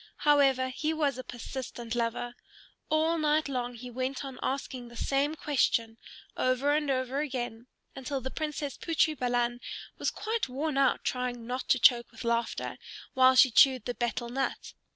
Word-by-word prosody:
However, 270 -3 +4
he 305 +5 -2
was 285 -5 0
a - - -5
persistent 240 -1 -6
lover. 240 0 -2 0.6
All 320 +2 +2
night 305 0 +2
long 245 -3 -3
he 245 +1 -9
went 255 +3 -3
on 265 -2 -8
asking 260 -2 -3
the 235 - -13
same 280 +5 0
question, 230 -7 0 0.4
over 255 +3 +1
and 300 -1 0
over 260 0 0
again, 245 -5 -4 0.3
until 270 +1 -3
the 260 +1 -5
Princess 300 -3 -4
Putri 325 -1 +2
Balan 245 -3 0 0.4
was - - +1
quite 440 - -2
worn 290 +3 -2
out 275 -1 +2
trying 250 -2 -2
not 250 +2 -4
to - - +5
choke 240 -1 +4
with 225 - -10
laughter 235 -1 -1 0.3
while 260 -1 +6
she 260 0 +7
chewed 260 +2 +5
the 245 - -2
betel 240 0 -2
nut. 270 +2 -3
260 Hz, 165 wpm, -29 LUFS, 245-285 Hz, 0.6 s, she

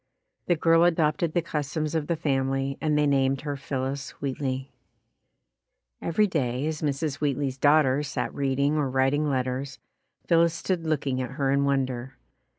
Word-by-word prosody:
The 175 - +3
girl 165 +1 +4
adopted 165 0 +2
the 175 - +1
customs 155 0 -3
of 155 -2 -1
the 170 - +1
family 135 -3 -1
and 150 -1 +1
they 150 - +3
named 135 -1 +2
her 145 -1 -3
Phillis 135 0 -3
Wheatley. 135 -1 -3 1.3
Every 190 +6 +2
day 135 -7 -1
as 155 -1 -3
Mrs. 145 -1 -1
Wheatley's 140 -2 -1
daughter 145 -2 +4
sat 150 0 -3
reading 140 +2 +1
or 145 -3 0
writing 135 +3 +1
letters, 130 +1 -2 0.5
Phillis 170 -1 +3
stood 170 -2 -2
looking 140 -4 0
at 125 -1 -5
her 135 -2 0
in 140 0 +2
wonder. 130 -2 -1
140 Hz, 155 wpm, -26 LUFS, 135-155 Hz, 1.3 s, girl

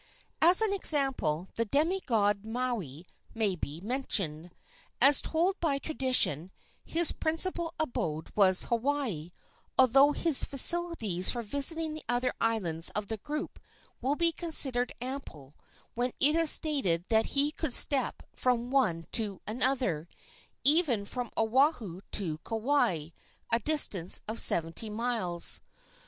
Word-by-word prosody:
As 355 +5 +7
an 420 -2 -1
example 265 - +1
the 230 - 0
demi 320 - -1
god 205 -4 -1
Maui 220 - -5 0.3
may 215 -4 -1
be 155 -2 -8
mentioned. 190 - -2 0.5
As 275 +2 +6
told 355 +5 -2
by 295 -5 -1
tradition, 255 - -2 0.3
his 335 0 +4
principal 330 +1 -2
abode 165 - -5
was 190 -3 +4
Hawaii, 235 - -4 0.5
although 270 +3 +4
his 315 -1 +3
facilities 275 - +2
for 240 -1 -3
visiting 305 +7 +1
the 310 - -10
other 245 +1 -1
islands 180 -8 -1
of 210 -1 -4
the 220 - -5
group 300 +7 -8 0.4
will 270 +4 -2
be 335 +1 0
considered 275 -8 +4
ample 245 - -9 0.4
when 245 +2 -2
it 295 +3 +2
is 330 -1 +4
stated 230 - +2
that 220 0 +1
he 285 +2 +1
could 315 -2 -4
step 270 -3 +3
from 245 -1 -2
one 185 -12 -1
to 210 -5 0
another, 225 - -2 0.5
even 280 - +3
from 245 +2 -6
Oahu 225 - -1
to 160 -6 +1
Kauai, 220 - -2 0.4
a 230 - +2
distance 210 - +3
of 220 +2 -2
seventy 165 +6 +1
miles. 210 -6 -1
245 Hz, 130 wpm, -27 LUFS, 195-290 Hz, 0.5 s, As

